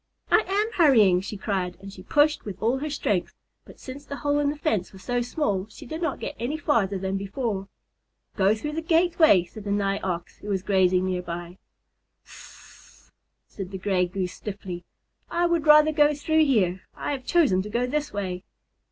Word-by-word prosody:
"I 440 - +5
am 415 +4 0
hurrying," 210 - +5
she 205 +2 -6
cried, 190 -3 -2
and 195 0 -10
she 185 - -11
pushed 295 +9 +2
with 195 -3 -7
all 240 +4 +1
her 305 +2 -3
strength, 205 -10 -1 0.3
but - - -15
since 275 +2 -9
the 280 - -6
hole 290 0 0
in 290 -1 +2
the 295 - -4
fence 220 - -1
was 190 -1 -14
so 245 +3 0
small, 210 -7 -1
she - - -12
did 315 +7 -6
not 325 -5 -1
get - - -5
any 255 +7 -2
farther 220 - +1
than 190 +1 -2
before. 200 0 -3 0.7
"Go 200 +1 +3
through 295 +7 -4
the 320 +2 -3
gateway," 325 - +4
said 200 +4 -11
the 205 - -5
Nigh 200 -1 0
Ox, 175 -2 -4
who - - -11
was 190 -2 -1
grazing 185 -2 +3
near 185 -1 -1
by. 175 +1 -7 0.7
"Sssss!" - - -17 0.3
said 195 -3 -8
the 190 - -6
Gray 185 -1 +1
Goose 180 0 -3
stiffly. 190 -4 -7 0.5
"I 345 +1 +1
would 340 -3 +1
rather 305 +1 +7
go 295 -1 +3
through 315 +2 +2
here. 190 -9 +2
I - - -3
have 270 -3 -4
chosen 270 - +3
to 210 - -7
go 240 +4 0
this 295 +3 -2
way." 185 -3 -4
210 Hz, 195 wpm, -25 LUFS, 190-295 Hz, 0.7 s, rather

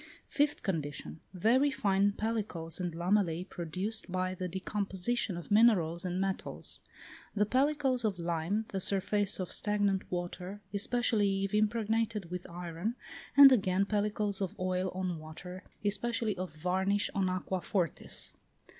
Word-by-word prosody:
Fifth 290 0 0
condition. 160 -4 -3
Very 235 +10 +3
fine 200 -5 +2
pellicles 205 -7 -3
and 175 -1 -2
lamellæ, 180 0 +1
produced 185 +5 -3
by 185 0 -1
the 185 0 -4
decomposition 195 +2 -1
of 175 - -9
minerals 190 -6 +4
and 180 0 -1
metals. 195 0 -3 0.6
The 210 0 +3
pellicles 265 +1 +1
of 210 -4 0
lime, 170 +5 -1
the 195 - -2
surface 200 +2 +1
of 185 - -3
stagnant 205 -2 +1
water, 180 +2 -4
especially 205 -2 +1
if 195 - -2
impregnated 215 -2 0
with 180 0 -5
iron, 175 +5 -4 0.4
and 280 -1 +11
again 195 -5 +3
pellicles 205 -1 0
of 190 - -3
oil 185 0 0
on 185 -3 -2
water, 180 +4 -9 0.2
especially 220 +1 0
of 185 -2 -4
varnish 190 +6 0
on 190 -2 +1
aqua 185 0 -2
fortis. 180 -3 0
195 Hz, 135 wpm, -32 LUFS, 180-210 Hz, 0.6 s, and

